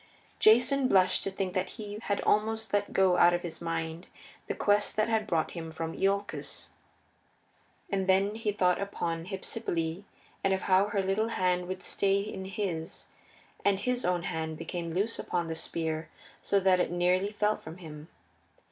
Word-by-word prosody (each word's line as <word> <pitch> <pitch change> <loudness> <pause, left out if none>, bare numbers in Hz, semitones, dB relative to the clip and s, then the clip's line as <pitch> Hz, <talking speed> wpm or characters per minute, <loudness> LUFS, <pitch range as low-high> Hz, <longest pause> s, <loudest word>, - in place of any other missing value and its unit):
Jason 255 +5 +5
blushed 185 -6 +3
to - - -1
think 190 -1 -3
that 185 0 -1
he 210 -1 -6
had 200 -3 -1
almost 220 +1 +1
let 205 0 +1
go 190 -2 +4
out 175 0 +6
of 175 - -4
his 170 -2 -6
mind 165 0 -3 0.4
the - - -2
quest 205 0 +2
that 215 - +2
had 220 -1 +1
brought 165 -4 0
him 165 -2 -6
from 160 0 -4
Iolcus. 200 +1 -2 1.2
And 195 -1 -1
then 195 +2 +3
he 220 -1 -1
thought 180 -3 +2
upon 170 -4 -3
Hypsipyle 185 -3 -3 0.4
and 195 0 +3
of 190 - -5
how 190 +1 +4
her 205 -2 0
little 195 +4 +1
hand 180 -4 0
would 185 0 -5
stay 195 0 +1
in 195 -2 -6
his, 185 -4 -4 0.5
and 200 -1 +3
his 250 0 0
own 180 -1 +1
hand 160 -3 -3
became 170 +1 -4
loose 210 +5 0
upon 175 -1 -2
the 160 - -2
spear 160 0 -3 0.3
so 200 - +2
that 185 -1 +4
it - - +1
nearly 180 +3 +2
fell 210 0 +1
from 160 +2 -10
him. 155 -3 -10
190 Hz, 175 wpm, -30 LUFS, 170-205 Hz, 1.2 s, out